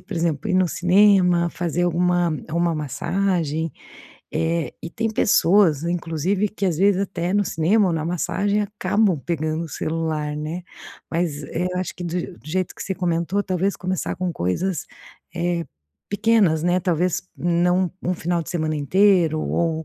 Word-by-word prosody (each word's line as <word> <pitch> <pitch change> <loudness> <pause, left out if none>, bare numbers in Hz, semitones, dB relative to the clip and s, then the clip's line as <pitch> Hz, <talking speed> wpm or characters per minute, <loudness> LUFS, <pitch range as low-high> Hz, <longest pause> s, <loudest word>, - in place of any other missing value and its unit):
por 200 - -8
exemplo, 165 0 -1
ir - - +1
no 185 0 +4
cinema, 180 -1 +4
fazer 175 0 -2
alguma 175 0 +2 0.2
uma 170 +1 +1
massagem, 160 +1 -1 0.6
eh, 165 +1 -1
e - - -4
tem 225 +6 -2
pessoas 185 -6 +4
inclusive 175 +4 -1
que, 200 0 -4
às 175 -5 0
vezes, 195 0 +4
até 180 -1 -2
no 205 0 +3
cinema 190 +5 +2
ou - - 0
na 160 -1 -1
massagem 185 +5 0
acabam 205 -2 +1
pegando 160 0 -2
o - - -8
celular, 155 -1 -2
né, 155 +4 -4 0.5
mas, 165 -4 -1
eh, 175 +6 -2
eu 180 - -2
acho 185 - -3
que - - -8
do 175 0 -2
je 175 - -3
do - - -13
jeito 185 +4 -2
que - - -7
você 190 - -3
comentou, 175 +2 0
talvez 190 +1 -1
começar 185 -1 -3
com 180 -1 -2
coisas, 165 - -2 0.5
eh, 170 -1 -1 0.4
pequenas, 205 -6 +3
né, 175 +1 +2
talvez 180 0 0
não 175 +1 +1
um 180 - 0
final 170 0 -1
de - - -11
semana 155 -3 -1
inteiro 175 +1 +3
ou, 160 -1 -1
175 Hz, 165 wpm, -22 LUFS, 165-185 Hz, 0.6 s, no